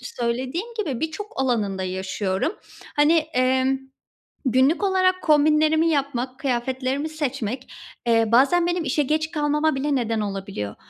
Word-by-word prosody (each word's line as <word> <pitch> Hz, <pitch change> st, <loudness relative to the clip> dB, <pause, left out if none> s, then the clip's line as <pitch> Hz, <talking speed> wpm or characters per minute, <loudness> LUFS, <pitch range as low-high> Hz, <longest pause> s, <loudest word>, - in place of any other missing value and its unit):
söylediğim 255 Hz, -, -3 dB
gibi, 280 Hz, -, -2 dB
birçok 320 Hz, +7 st, -4 dB
alanında 210 Hz, -7 st, 0 dB
yaşıyorum. 190 Hz, -, -2 dB, 0.4 s
Hani, 295 Hz, +2 st, +5 dB
emm, 260 Hz, -3 st, +1 dB, 0.7 s
günlük 260 Hz, -, +3 dB
olarak 370 Hz, -1 st, +2 dB
kombinlerimi 310 Hz, +1 st, +4 dB
yapmak, 265 Hz, -4 st, -2 dB
kıyafetlerimi 260 Hz, +2 st, -1 dB
seçmek, 270 Hz, -5 st, -4 dB, 0.4 s
eee, 225 Hz, -2 st, +3 dB
bazen 310 Hz, +8 st, +4 dB
benim 350 Hz, -1 st, 0 dB
işe 290 Hz, +3 st, +1 dB
geç 310 Hz, +3 st, -1 dB
kalmama 300 Hz, -1 st, +1 dB
bile 280 Hz, +2 st, 0 dB
neden 230 Hz, -3 st, 0 dB
olabiliyor. 195 Hz, -, -4 dB
270 Hz, 120 wpm, -23 LUFS, 240-310 Hz, 0.7 s, Hani